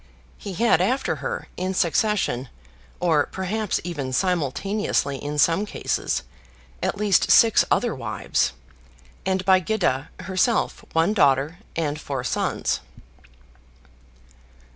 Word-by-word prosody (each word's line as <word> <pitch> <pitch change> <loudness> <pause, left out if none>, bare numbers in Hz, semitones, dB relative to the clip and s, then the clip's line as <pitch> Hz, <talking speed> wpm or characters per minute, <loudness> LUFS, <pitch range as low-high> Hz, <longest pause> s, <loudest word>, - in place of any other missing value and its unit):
He 200 - -6
had 205 -2 +3
after 255 +8 0
her, 485 0 -4
in 185 +1 -2
succession, 170 - +1 0.5
or 160 -5 +2
perhaps 200 +2 -2
even 145 -7 -4
simultaneously 180 0 0
in 145 +2 -5
some 165 +6 +3
cases, 65 - -2 0.6
at - - -1
least 205 -3 +2
six 225 -2 +6
other 240 - +2
wives; 110 -7 -1 0.7
and 190 -1 0
by 190 -1 +6
Gyda 170 -8 0
herself 195 +5 0
one 165 +5 +3
daughter 150 -2 +2 0.2
and 150 -2 -2
four 135 -3 -4
sons. - - -1
180 Hz, 110 wpm, -23 LUFS, 145-205 Hz, 0.7 s, six